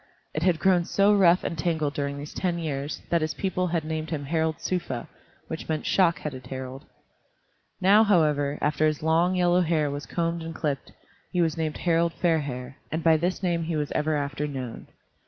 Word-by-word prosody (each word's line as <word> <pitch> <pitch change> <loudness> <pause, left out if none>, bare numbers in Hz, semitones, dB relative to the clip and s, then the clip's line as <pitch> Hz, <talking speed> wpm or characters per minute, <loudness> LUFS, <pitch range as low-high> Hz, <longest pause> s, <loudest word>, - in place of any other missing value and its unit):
It 155 - -2
had 175 -1 +3
grown 180 +1 +3
so 200 +3 +3
rough 180 -2 +5
and 170 - -2
tangled 155 -2 -1
during 140 -1 -2
these 145 +1 -7
ten 180 -2 -1
years 145 -3 -4
that 170 -1 +3
his 155 0 -1
people 185 -1 -1
had 170 -2 -1
named 155 0 -3
him 145 -4 -3
Harald 160 +1 0
Sufa, 135 -10 -3 0.4
which 160 0 -6
meant 155 -1 -1
"Shock 170 -4 +3
headed 130 -4 -6
Harald." 130 0 -7 0.9
Now, 205 +4 +6
however, 150 -8 +2
after 150 +1 +2
his 155 0 -2
long, 165 +3 +3
yellow 180 0 +3
hair 155 -4 +1
was 145 +1 -5
combed 170 0 -1
and 165 0 -6
clipped, 145 -4 -3 0.4
he 180 - -1
was 165 -2 +2
named 160 -2 -2
Harald 170 -1 +1
Fairhair, 140 -7 -1
and 160 +1 -2
by 165 -1 +6
this 175 +4 -1
name 170 -2 +1
he 165 0 -2
was 150 -1 -2
ever 155 0 0
after 145 0 -2
known. 130 -5 -6
160 Hz, 190 wpm, -26 LUFS, 145-170 Hz, 0.9 s, Now